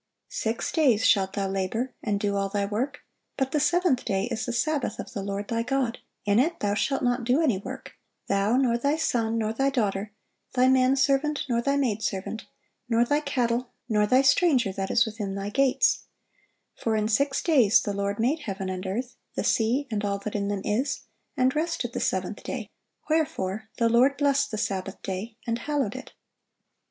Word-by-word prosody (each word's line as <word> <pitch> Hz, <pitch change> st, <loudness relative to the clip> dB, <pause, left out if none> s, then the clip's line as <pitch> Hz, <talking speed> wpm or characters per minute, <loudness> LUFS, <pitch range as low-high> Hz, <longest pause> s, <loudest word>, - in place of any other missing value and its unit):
Six -, -, -2 dB
days 250 Hz, -8 st, +3 dB
shalt 190 Hz, -1 st, +3 dB
thou 200 Hz, -1 st, -1 dB
labor, 195 Hz, +6 st, -2 dB
and 205 Hz, -2 st, -1 dB
do 200 Hz, -1 st, 0 dB
all 195 Hz, 0 st, 0 dB
thy 200 Hz, 0 st, 0 dB
work: 250 Hz, +8 st, -3 dB, 0.4 s
but 265 Hz, -1 st, 0 dB
the 300 Hz, -, +1 dB
seventh 300 Hz, -2 st, +2 dB
day 195 Hz, -3 st, 0 dB
is 225 Hz, 0 st, -2 dB
the -, -, -1 dB
Sabbath 285 Hz, +4 st, -1 dB
of -, -, -7 dB
the 205 Hz, -, -3 dB
Lord 200 Hz, +1 st, -4 dB
thy 230 Hz, 0 st, 0 dB
God: 250 Hz, -1 st, -1 dB, 0.3 s
in 205 Hz, +2 st, +3 dB
it 320 Hz, +7 st, +1 dB
thou 205 Hz, -1 st, 0 dB
shalt 270 Hz, +6 st, 0 dB
not 245 Hz, 0 st, +1 dB
do 250 Hz, +5 st, +2 dB
any 260 Hz, -, +2 dB
work, -, -, -8 dB, 0.4 s
thou, 200 Hz, +4 st, +2 dB
nor 240 Hz, -3 st, +2 dB
thy 280 Hz, +4 st, +1 dB
son, 230 Hz, -7 st, 0 dB
nor 220 Hz, -1 st, 0 dB
thy 270 Hz, +4 st, +1 dB
daughter, 210 Hz, -5 st, -1 dB, 0.4 s
thy 255 Hz, 0 st, +5 dB
man 260 Hz, 0 st, +4 dB
servant, 280 Hz, +2 st, +1 dB
nor 235 Hz, -2 st, +1 dB
thy 275 Hz, +3 st, +1 dB
maid 230 Hz, -6 st, 0 dB
servant, 205 Hz, +1 st, -3 dB, 0.4 s
nor 235 Hz, 0 st, +3 dB
thy 290 Hz, +4 st, +2 dB
cattle, 250 Hz, -4 st, -1 dB, 0.2 s
nor 210 Hz, -3 st, +2 dB
thy 255 Hz, +4 st, +4 dB
stranger 270 Hz, -, +3 dB
that 190 Hz, 0 st, -3 dB
is 235 Hz, -, +4 dB
within 210 Hz, -3 st, -4 dB
thy 200 Hz, +1 st, -3 dB
gates: 275 Hz, -, +2 dB, 0.7 s
for 225 Hz, -1 st, -1 dB
in 215 Hz, 0 st, +1 dB
six 275 Hz, +5 st, +1 dB
days 250 Hz, -, +5 dB
the 205 Hz, -, -3 dB
Lord 200 Hz, 0 st, -2 dB
made 265 Hz, +8 st, +1 dB
heaven 195 Hz, -8 st, -4 dB
and 185 Hz, +1 st, -5 dB
earth, 240 Hz, +6 st, -4 dB, 0.2 s
the -, -, -1 dB
sea, 245 Hz, +6 st, +1 dB
and 210 Hz, -1 st, -1 dB
all 200 Hz, -1 st, 0 dB
that 200 Hz, +1 st, -6 dB
in 200 Hz, -1 st, -1 dB
them 200 Hz, -1 st, -2 dB
is, 225 Hz, +7 st, 0 dB, 0.4 s
and 255 Hz, +1 st, +2 dB
rested 320 Hz, +3 st, -1 dB
the -, -, -2 dB
seventh -, -, -1 dB
day: -, -, -5 dB, 0.4 s
wherefore 220 Hz, -10 st, -1 dB
the 230 Hz, -, +3 dB
Lord 250 Hz, +5 st, +4 dB
blessed 280 Hz, -1 st, +2 dB
the 215 Hz, -, -4 dB
Sabbath 195 Hz, -2 st, -3 dB
day, 200 Hz, +4 st, -5 dB
and 230 Hz, 0 st, -1 dB
hallowed 275 Hz, -5 st, -1 dB
it." 260 Hz, -, -9 dB
235 Hz, 195 wpm, -26 LUFS, 205-270 Hz, 0.7 s, thy